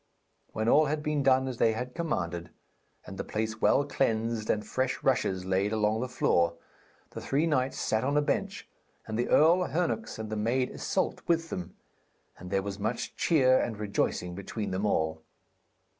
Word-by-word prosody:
When 110 +1 -1
all 150 +5 +5
had 150 +1 -2
been 150 -1 0
done 130 -1 +3
as 130 -2 -4
they 115 - +3
had 125 +3 -5
commanded, 85 - -3 0.6
and - - -9
the - - -1
place 110 0 -3
well 140 - +4
cleansed 115 -5 -1
and 105 0 0
fresh 130 0 -2
rushes 95 -8 +1
laid 95 +2 +1
along 110 0 +1
the 130 - -3
floor, 85 -8 +2 0.6
the - - -7
three 145 +4 +1
knights 135 -5 0
sat 110 0 0
on 140 +3 +1
a - - +4
bench, - - -2 0.4
and 110 - -5
the 120 +2 -1
Earl 170 +4 +5
Hernox 180 +7 -2
and 110 -1 -6
the - - -1
maid 120 +4 0
Issyllt - - -1
with 165 -1 +1
them, 90 0 -5 0.6
and 90 - -9
there 95 0 0
was 100 0 -5
much 105 - -3
cheer 130 -6 +4
and 110 -3 -2
rejoicing 100 -3 -1
between 100 +3 -5
them 95 +3 -1
all. 80 -4 0
110 Hz, 180 wpm, -29 LUFS, 100-135 Hz, 0.6 s, all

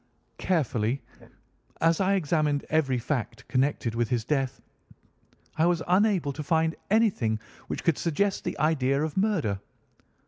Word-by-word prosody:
Carefully 130 - 0 0.8
as 165 +2 +3
I 195 +1 +3
examined 150 -4 +1
every 145 -5 +2
fact 125 0 -3
connected 130 -3 0
with 115 -1 0
his 120 -3 0
death, 135 -2 -1 1.0
I 165 - +5
was 170 -2 +1
unable 185 -5 +2
to 150 - -5
find 160 +2 +1
anything 190 - +2 0.3
which - - -4
could 165 -4 +2
suggest 195 +5 0
the - - -3
idea 140 -2 +2
of 155 -2 -3
murder. 185 - +1
150 Hz, 135 wpm, -27 LUFS, 130-175 Hz, 1.0 s, I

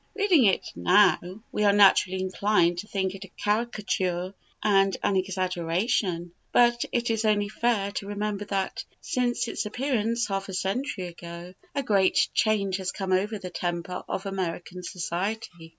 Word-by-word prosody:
Reading 380 - +4
it 195 - +3
now, 185 -2 +5 0.3
we 210 - -1
are 205 - +6
naturally 195 -2 +5
inclined 185 -2 +2
to 210 - -6
think 190 -2 -1
it 195 0 -8
a - - -10
caricature 200 -5 -1 0.3
and 195 -2 +3
an 200 - +2
exaggeration; 185 -1 -1 0.2
but 240 0 +4
it 240 -1 0
is 225 0 0
only 205 -2 +2
fair 215 -3 0
to 200 0 -5
remember 205 0 -3
that, 195 -2 -2 0.2
since 245 -1 -1
its 225 - -3
appearance 235 -1 0
half 195 -1 -3
a 190 - -4
century 195 +1 -2
ago, 170 0 -9 0.2
a 280 - 0
great 195 -5 +3
change 200 -3 +1
has 190 -2 -3
come 190 -2 -4
over 205 +4 +1
the 185 -2 -7
temper 175 +1 -3
of 190 - -3
American 180 -2 -4
society. 180 0 -4
195 Hz, 155 wpm, -26 LUFS, 185-215 Hz, 0.3 s, are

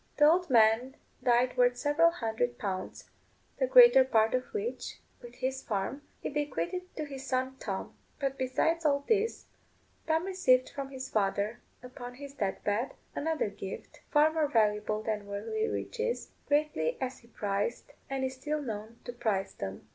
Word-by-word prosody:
The 295 - +6
old 345 +2 +4
man 230 +2 +4 0.3
died 245 +1 +3
worth 245 0 +4
several 295 +5 +4
hundred 240 -5 -2
pounds, 195 -5 -4 0.5
the - - +2
greater 480 - +9
part 225 -4 +3
of 255 0 +1
which, 435 +2 -4 0.2
with 240 -1 -11
his 260 +1 -2
farm, 210 +7 -2 0.2
he - - -3
bequeathed 350 +5 -3
to 310 - -2
his 275 -2 -7
son 260 0 -1
Tom. 195 -2 -4 0.3
But 275 -2 -1
besides 320 +6 0
all 280 -2 +2
this, 445 0 +1 0.6
Tom 320 +2 +2
received 260 -10 +3
from 275 -1 -5
his 265 -1 -6
father, 205 +1 0 0.2
upon 250 -1 -8
his 280 +1 -9
death 200 -8 -2
bed, 215 +6 -1 0.2
another 310 -8 -1
gift, 195 -1 -8
far 305 +1 +4
more 315 -2 +2
valuable 215 -3 +1
than 210 -2 -2
worldly 325 - -2
riches, 475 +1 -3 0.2
greatly 290 - +1
as 260 -1 -3
he 235 - -21
prized 205 +3 -2 0.2
and 270 -1 -2
is 260 - -3
still 300 +4 -2
known 225 -4 -6
to 245 - -6
prize 210 -5 -1
them. 95 0 -6
260 Hz, 160 wpm, -30 LUFS, 220-300 Hz, 0.6 s, greater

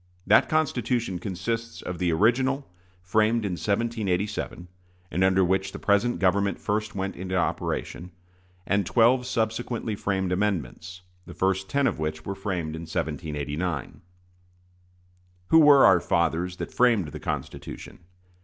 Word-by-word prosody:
That 105 - +5
Constitution 125 - 0
consists 115 +5 -4
of 90 -1 -5
the 90 -2 +1
original, 130 - +2 0.4
framed 110 +4 +2
in 100 - -1
1787, 100 -2 -2 0.4
and 90 +4 +1
under 95 0 +4
which 95 +1 0
the - - -5
present 105 +4 +1
government 100 +1 +1
first 105 0 -2
went 95 0 -3
into 95 +1 -4
operation, 85 +1 -2 0.6
and 100 +1 +1
twelve 125 +5 +3
subsequently 115 -1 -2
framed 95 -2 -1
amendments, 90 -2 -2 0.3
the - - -10
first 95 0 0
ten 140 0 +1
of - - 0
which 80 0 -3
were 100 - -3
framed 90 -6 -3
in 80 0 -7
1789. 80 -1 -3 1.5
Who 160 - +7
were 145 -3 +7
our 95 -2 +6
fathers 85 +1 0
that - - -6
framed 115 -10 +3
the - - -8
Constitution? - - -6
95 Hz, 135 wpm, -26 LUFS, 90-115 Hz, 1.5 s, Who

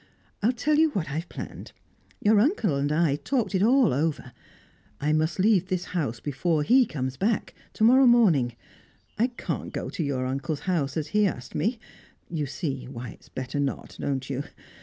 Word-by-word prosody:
I'll 220 +4 +3
tell 285 +5 +1
you 320 0 +5
what 170 -7 -2
I've 160 +4 -4
planned; - - -8 0.5
your 210 0 +4
uncle 225 - +2
and 140 +1 0
I 155 -2 +2
talked 215 - -1
it 190 - +2
all 250 - +4
over. 145 -3 -1 0.7
I 150 +2 +1
must 155 +1 +1
leave 190 -2 +3
this 185 -1 -2
house 135 -10 -1
before 150 +4 0
he 250 - +5
comes 130 -5 -4
back, 215 +3 0 0.2
to - - -1
morrow 255 +3 +7
morning. 170 - +4 0.6
I 235 - +4
can't 245 -1 -5
go - - -4
to 170 - -2
your 135 -3 -1
uncle's 135 +3 -3
house, 160 -7 -1
as 150 -1 -2
he 210 +2 +3
asked 125 -8 -6
me; 230 +4 0 0.5
you 155 -4 -2
see 135 -3 -4
why 125 -2 -7
it - - -12
is - - -20
better 130 +2 -4
not, 140 -1 -3
don't 135 -2 -2
you? 140 0 -3
160 Hz, 185 wpm, -26 LUFS, 140-215 Hz, 0.7 s, morrow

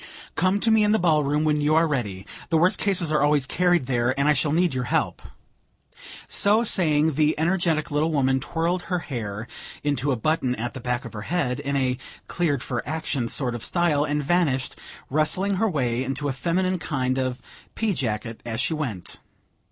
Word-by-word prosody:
Come 185 +2 +2
to 225 - +3
me 220 -1 +5
in 210 0 +3
the - - +4
ball 160 -6 +3
room 145 +2 +1
when 150 -1 +2
you 150 +1 +2
are 165 +1 +4
ready; 105 -10 -3 0.2
the 165 - +3
worst 180 +4 +3
cases 185 -6 0
are 155 - +2
always 145 -2 +3
carried 175 0 +2
there, 125 +1 0
and 140 - +2
I 150 - +5
shall 145 +1 0
need 170 0 +2
your 125 -1 -2
help." - - -1 1.1
So 210 +3 +3
saying, 160 -7 +3
the 150 +2 +2
energetic 165 -2 0
little 150 +3 +1
woman 135 -3 +2
twirled 170 +5 -1
her 180 - +1
hair 115 - -5 0.4
into 145 -1 0
a - - +2
button 130 0 0
at 120 +1 -4
the 130 - -7
back 125 0 -2
of - - -8
her 105 - -6
head, 140 -7 0
in 140 0 -2
a 130 -2 0 0.3
"cleared 145 -7 0
for 120 -3 -2
action" 145 -6 -2
sort 125 -2 0
of 120 - -5
style, 170 -5 +2
and 150 0 -1
vanished, 140 -5 +1 0.4
wrestling 185 +7 +1
her 220 +3 +2
way 125 -7 0
into 135 +2 -3
a 135 - -1
feminine 180 +7 0
kind 130 -4 -1
of 130 -1 -1 0.4
pea 220 -3 0
jacket 115 -5 -3
as 115 -1 -4
she 150 - +1
went. 125 - -4
150 Hz, 200 wpm, -24 LUFS, 130-170 Hz, 1.1 s, me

